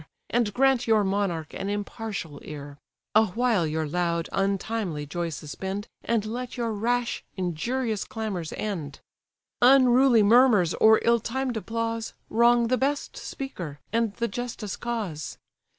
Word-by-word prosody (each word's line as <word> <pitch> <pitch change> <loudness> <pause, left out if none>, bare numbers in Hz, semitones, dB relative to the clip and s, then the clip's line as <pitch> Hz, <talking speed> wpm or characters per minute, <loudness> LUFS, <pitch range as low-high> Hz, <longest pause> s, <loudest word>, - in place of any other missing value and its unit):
And 235 -3 +2
grant 260 +1 +2
your 220 -2 +4
monarch 190 -6 -1
an 195 - -4
impartial 205 -6 -4
ear: 145 -1 -8 0.3
Awhile 220 -3 +3
your 155 0 -1
loud, 170 +1 -1
untimely 195 -4 -1
joy 170 +3 -3
suspend, 190 +7 -5 0.2
And 225 -2 0
let 245 +3 -5
your 235 -2 -1
rash, 235 +3 -1
injurious 215 +6 -1
clamours 200 -8 -4
end: 165 -10 -4 0.6
Unruly 255 -2 +6
murmurs, 215 -6 +5
or 220 0 +6
ill 235 0 +4
timed 255 +2 -2
applause, 230 +1 -3 0.2
Wrong 235 +1 +5
the 255 +2 +2
best 280 +2 -1
speaker, 175 - -6
and 225 -3 +1
the 235 - -1
justest 235 -2 -5
cause. 210 -11 -4
215 Hz, 130 wpm, -26 LUFS, 180-240 Hz, 0.6 s, Unruly